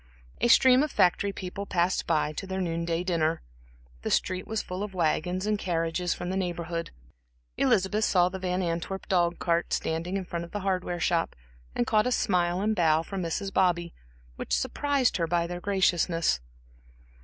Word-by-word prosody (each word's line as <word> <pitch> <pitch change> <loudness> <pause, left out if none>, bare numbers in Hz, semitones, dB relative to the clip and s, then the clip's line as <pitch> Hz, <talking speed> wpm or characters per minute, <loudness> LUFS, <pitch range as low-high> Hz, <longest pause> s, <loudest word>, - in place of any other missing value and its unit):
A - - +2
stream 255 +2 +6
of 305 - 0
factory 200 +3 +2
people 195 +1 -6
passed 175 +1 0
by 155 -2 +1
to 195 - -6
their 190 0 -3
noon 170 -2 -2
day 170 +1 -1
dinner; 165 -3 0 0.6
the - - -3
street 185 0 0
was 220 -1 -2
full 180 +1 -5
of 205 -2 -5
wagons 180 +2 0
and 210 -1 0
carriages 170 -1 -1
from 180 - -3
the - - -2
Neighborhood. 170 -2 -3 0.7
Elizabeth 215 -4 +2
saw 180 -4 +4
the 190 +1 -5
Van 185 0 -1
Antwerp 170 +3 -3
dog 175 -3 +2
cart 170 -1 0
standing 165 +4 -1
in 190 - -4
front 170 -1 -4
of 170 - -9
the 205 - -3
hardware 185 -2 -1
shop, 170 -1 0 0.4
and 120 - +1
caught 215 +2 +2
a - - 0
smile 180 -5 +1
and 215 +1 +1
bow 160 -3 +3
from 195 +2 -5
Mrs. 190 +3 -3
Bobby, 175 -2 +1 0.4
which - - -1
surprised 275 - +1
her 165 -2 0
by 170 0 +1
their 175 +1 -5
graciousness. 175 - +1
180 Hz, 180 wpm, -27 LUFS, 170-195 Hz, 0.7 s, stream